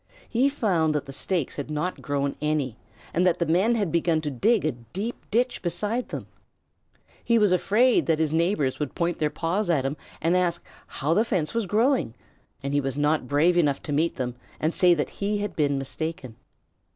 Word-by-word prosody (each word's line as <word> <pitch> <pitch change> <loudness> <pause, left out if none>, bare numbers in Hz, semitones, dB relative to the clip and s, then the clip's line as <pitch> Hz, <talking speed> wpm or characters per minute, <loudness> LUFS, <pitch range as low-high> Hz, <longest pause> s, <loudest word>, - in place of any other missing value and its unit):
He 250 +4 +2
found 175 - +1
that 145 -1 -1
the 135 - -8
stakes 170 0 -1
had 145 0 -4
not 155 +4 -3
grown 140 -1 -1
any, 150 -6 0 0.4
and 175 - +2
that 180 - +3
the 170 - 0
men 185 +9 +3
had 205 -7 0
begun 170 -1 +2
to 150 -2 -3
dig 205 - +2
a 155 - +2
deep 175 - -7
ditch 245 +3 0
beside 210 +8 -2
them. - - -5 1.0
He 235 - +3
was 210 -4 +4
afraid 220 +7 +3
that 160 -2 +3
his 160 -1 0
neighbors 165 -5 +1
would 150 -3 -3
point 170 -1 -1
their 150 - +1
paws 170 +7 -1
at 145 -6 +2
him 135 +2 -1 0.2
and 165 +3 +2
ask 175 -2 0 0.2
how 150 +4 -1
the 215 - +4
fence 175 -8 -1
was 230 -4 -1
growing, 225 - +1 0.5
and 140 +1 -2
he 145 - +2
was 135 0 -3
not 150 -2 +1
brave 155 +6 +3
enough 145 -5 +2
to 145 - -3
meet 160 +4 +1
them 125 -2 -3 0.3
and 155 +2 0
say 180 -1 +5
that 150 - -2
he 205 +1 +1
had 205 -3 -4
been 145 -2 +1
mistaken. 135 -2 -4
165 Hz, 200 wpm, -25 LUFS, 145-200 Hz, 1.0 s, say